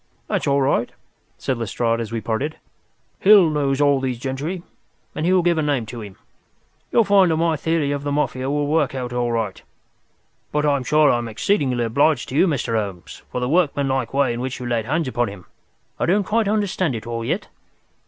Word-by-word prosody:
"That's - - -1
all 140 0 +3
right," 135 -3 +1 0.5
said 130 -3 -2
Lestrade, 115 +1 -1
as 115 -2 -4
we 115 -1 -3
parted. 130 +9 -2 0.6
"Hill 195 -5 +6
knows 140 -2 0
all 145 -2 +4
these 130 -2 -2
gentry, 140 +8 -4 0.5
and 155 - -2
he - - +3
will 185 -2 +4
give 170 -2 +2
a - - +2
name 145 -6 0
to 115 +1 -8
him. 100 -3 -9 0.8
You'll 230 - +5
find 200 -3 +4
that 160 - +1
my 165 0 +2
theory 155 -1 0
of 145 -1 -2
the 145 0 -3
Mafia 135 -2 -1
will 145 +1 0
work 145 -2 +1
out 125 -2 -4
all 120 -1 0
right. 110 -4 -2 0.9
But 150 0 0
I'm 140 -3 +2
sure 150 +2 +4
I 120 - +1
am 120 - -4
exceedingly 125 - 0
obliged 135 +4 +1
to 130 - -5
you, 185 - +4
Mr. 135 -7 -1
Holmes, 100 -5 -4
for - - -2
the 125 - -1
workmanlike 140 -5 +1
way 140 -3 +1
in 120 - -4
which 130 0 -4
you 125 - -6
laid 120 -2 -1
hands 155 +4 -1
upon 120 -2 0
him. 100 -3 -9 0.5
I - - 0
don't 200 +4 +3
quite 220 +2 0
understand 195 - 0
it 110 - -6
all 115 0 -4
yet." - - -2
140 Hz, 210 wpm, -21 LUFS, 120-155 Hz, 0.9 s, Hill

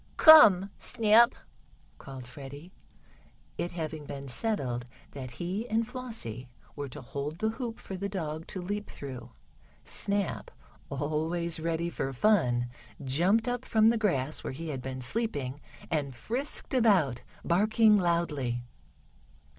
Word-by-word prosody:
"Come, 205 - +8
Snap!" 230 +2 +5 0.6
called 135 -2 -9
Freddie, 140 +6 -10 0.9
it 175 - -2
having 155 -3 -5
been 140 0 -7
settled 125 - -2 0.3
that 130 -2 -7
he 185 - -4
and 225 +1 +1
Flossie 225 - -6 0.3
were 145 -1 -4
to 130 - -9
hold 140 +5 -5
the 220 +4 0
hoop 230 0 -5
for 190 - -7
the 200 +2 -3
dog 160 -4 -4
to 185 - -6
leap 205 +3 -4
through. 125 -4 -8 0.5
Snap, 200 -2 -1 0.4
always 160 +4 -2
ready 165 +1 -1
for 135 - -3
fun, 125 - +2 0.4
jumped 180 - +2
up 245 0 -1
from 220 -2 +4
the 235 - +3
grass 150 - 0
where - - -4
he 160 +4 -6
had 135 -4 -4
been 130 0 -5
sleeping, 145 - -2 0.3
and 140 -5 -1
frisked 250 - -1
about, 190 - +3 0.2
barking 215 +4 +4
loudly. 155 -10 0
170 Hz, 130 wpm, -29 LUFS, 135-215 Hz, 0.9 s, Come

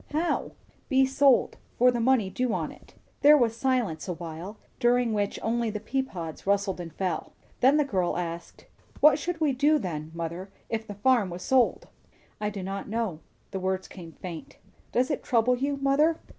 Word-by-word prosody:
How?" 325 +3 -1 0.4
"Be 265 -1 +4
sold. 270 -1 +3 0.2
For 250 +1 +5
the 240 - -2
money 230 -5 +2
due 250 +2 -1
on - - -3
it." - - -17 0.3
There 295 +1 +8
was 230 -4 +2
silence 235 - 0
awhile, 175 +3 -6 0.2
during 240 -2 +3
which 205 -1 -1
only 235 0 0
the 210 0 -4
pea 265 +5 -1
pods 170 -10 -7
rustled 200 -1 +1
and 165 -1 -7
fell; 180 -3 -3 0.3
then 270 +4 +5
the 300 - +3
girl 185 -10 0
asked, 170 -1 -6 0.3
"What 300 -1 +6
should 340 +2 -3
we 310 -3 +2
do 290 +4 +3
then, 155 - -4
mother, 170 +3 -5 0.2
if 220 -1 -3
the 205 - -7
farm 225 -2 +3
was 175 +1 -7
sold?" 255 +2 +2 0.5
"I 210 0 -1
do 200 -2 -6
not 195 +2 -5
know." 220 -7 -2 0.3
The 190 - -3
words 190 0 -2
came 170 -4 -11
faint. 170 -4 -9 0.3
"Does 255 +4 +1
it 290 - -1
trouble 245 +1 +2
you, 280 +3 -1
mother?" 280 +4 +3
225 Hz, 185 wpm, -27 LUFS, 185-265 Hz, 0.5 s, There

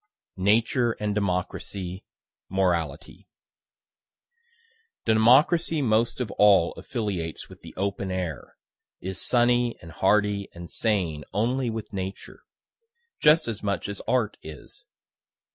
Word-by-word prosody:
NATURE 115 +5 +2
AND 105 -1 -3
DEMOCRACY 95 -1 -3 0.5
MORALITY 85 -4 -1 1.8
Democracy 135 +9 +4
most 115 0 +1
of 120 -5 -3
all 100 -5 +6
affiliates 100 - -4
with - - -14
the - - -12
open 100 0 -2
air, 90 -6 -5 0.4
is 95 +1 -4
sunny 120 -1 +3
and 85 - -12
hardy 100 +2 +1
and 85 0 -9
sane 90 -9 0
only 120 +4 0
with 110 -1 -6
Nature 95 0 -6 0.8
just 155 0 +5
as 110 -3 -3
much 100 -1 -2
as 100 -1 -5
Art 115 -5 +1
is. 80 -2 -11
100 Hz, 110 wpm, -26 LUFS, 95-115 Hz, 1.8 s, all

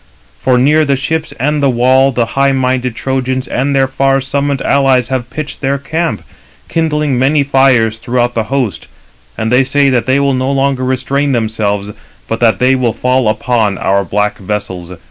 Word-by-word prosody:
For 125 - +2
near 150 +5 +3
the 140 -2 +1
ships 160 +4 -2
and 150 +3 0
the 140 - +3
wall 130 +2 +3
the 120 -2 0
high 140 0 +2
minded 130 -2 -1
Trojans 130 +1 -2
and 140 +2 -1
their 135 -1 +3
far 135 +1 +1
summoned 140 +1 -1
allies 135 -3 +2
have 130 -2 -3
pitched 150 -2 -6
their 140 0 0
camp, 160 +4 -3 0.4
kindling 150 -5 0
many 140 +3 +2
fires 130 -5 +2
throughout 120 +1 -1
the 115 -2 -1
host; 130 -6 -2 0.5
and 110 +1 -2
they 125 +2 +4
say 140 +1 +2
that 120 -2 0
they 130 +2 +3
will 140 -1 +1
no 130 +1 -1
longer 135 -1 0
restrain 135 +2 0
themselves, 105 -3 -1 0.4
but 115 - -3
that 115 -2 +3
they 125 +1 +3
will 125 -4 0
fall 125 -1 0
upon 110 -2 0
our 100 +1 +1
black 105 +3 -1
vessels. 95 -3 -5
130 Hz, 180 wpm, -13 LUFS, 120-140 Hz, 0.5 s, they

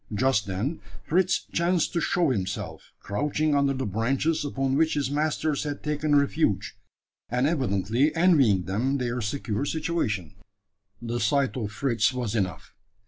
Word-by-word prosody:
Just 115 -2 +2
then 105 - -3 0.2
Fritz 185 +3 +1
chanced 170 0 +1
to 170 - 0
show 170 -4 +2
himself 95 -4 -4
crouching 150 +7 -1
under 140 -1 +2
the 130 - -2
branches 130 - 0
upon 135 -2 -1
which 160 +2 +2
his 140 -2 -1
masters 150 0 0
had 145 -1 -4
taken 150 0 0
refuge, 140 -6 +1 0.5
and 125 +2 +1
evidently 130 - +1
envying 140 - +4
them 115 +10 0
their 125 -1 -2
secure 110 +1 -2
situation. 145 - -2 0.7
The 120 +1 -2
sight 140 -1 +1
of 110 -5 -3
Fritz 115 +1 +1
was 120 -4 -2
enough. 95 -5 -3
135 Hz, 140 wpm, -26 LUFS, 110-150 Hz, 0.7 s, envying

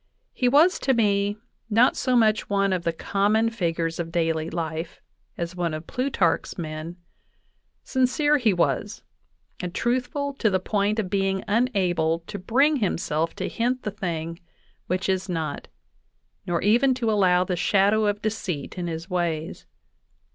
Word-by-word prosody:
He 250 - +2
was 310 +8 +5
to 265 - +1
me 205 -2 +1 0.3
not 230 +4 +4
so 255 - 0
much 220 -2 +3
one 200 -1 +2
of 180 - -1
.the 170 - +2
common 210 +6 +1
figures 165 -6 -2
of 165 -1 -3
daily 165 -1 0
life, 165 0 -4 0.4
as 170 +1 -4
one 170 -3 -1
of 155 +1 -7
Plutarch's 250 -10 0
men.... 155 +1 -5 0.9
Sin 260 -1 +2
cere 295 +3 +2
he 230 -4 +3
was, 175 -2 -1 0.6
and 180 -1 -5
truthful 260 +4 -1
to 220 - +3
the 185 -1 +1
point 205 +2 0
of 195 -5 -2
being 195 -1 0
unable 185 -8 +1
to 200 - -6
bring 275 +10 +3
himself 165 - -1
to - - -3
hint 250 +2 -1
the 210 - -2
thing 170 -4 -4 0.5
which 185 +2 -1
is 190 0 -1
not, 165 -3 -3 0.8
nor 175 -1 0
even 245 +6 +4
to 235 -3 0
allow 180 -4 +4
the 185 0 -2
shadow 205 +4 +3
of 205 0 -1
deceit 190 -8 -3
in 175 - -3
his 165 +1 -5
ways. 170 -4 -3
195 Hz, 155 wpm, -25 LUFS, 170-225 Hz, 0.9 s, was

